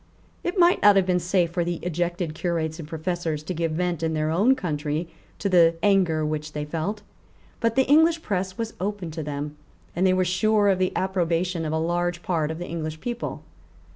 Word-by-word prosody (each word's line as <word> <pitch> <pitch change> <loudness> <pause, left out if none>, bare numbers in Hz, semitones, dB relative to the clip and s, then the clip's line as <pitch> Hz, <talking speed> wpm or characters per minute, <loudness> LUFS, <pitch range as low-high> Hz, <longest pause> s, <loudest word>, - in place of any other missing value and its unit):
It 350 +3 -2
might 350 0 +5
not 205 -1 +7
have 195 -2 +4
been 180 -1 +2
safe 175 -1 +1
for 175 0 0
the 175 0 -2
ejected 175 -1 -2
Curates 160 -1 -2
and 155 - -7
Professors 160 -1 -3
to 180 - -4
give 165 -1 -1
vent 175 0 -1
in 160 -1 0
their 155 0 0
own 210 +11 +4
country 155 - -2 0.3
to 205 - -2
the 170 -3 +5
anger 180 -6 +3
which 150 0 -3
they 150 0 -3
felt. 175 +7 -3 0.6
But 230 -1 +1
the 265 0 +4
English 320 +3 +4
press 190 -2 -2
was 225 -1 -3
open 195 -3 -3
to 160 +1 -5
them; 150 0 -5 0.4
and 175 - 0
they 185 - +4
were 185 0 +2
sure 205 +3 +3
of 190 -1 +2
the 185 0 +1
approbation 180 -2 0
of 155 - -2
a 160 - 0
large 175 +1 -1
part 160 -4 0
of 160 - -4
the 175 - -5
English 155 -2 -5
people. 240 +3 -4
175 Hz, 205 wpm, -25 LUFS, 160-190 Hz, 0.6 s, not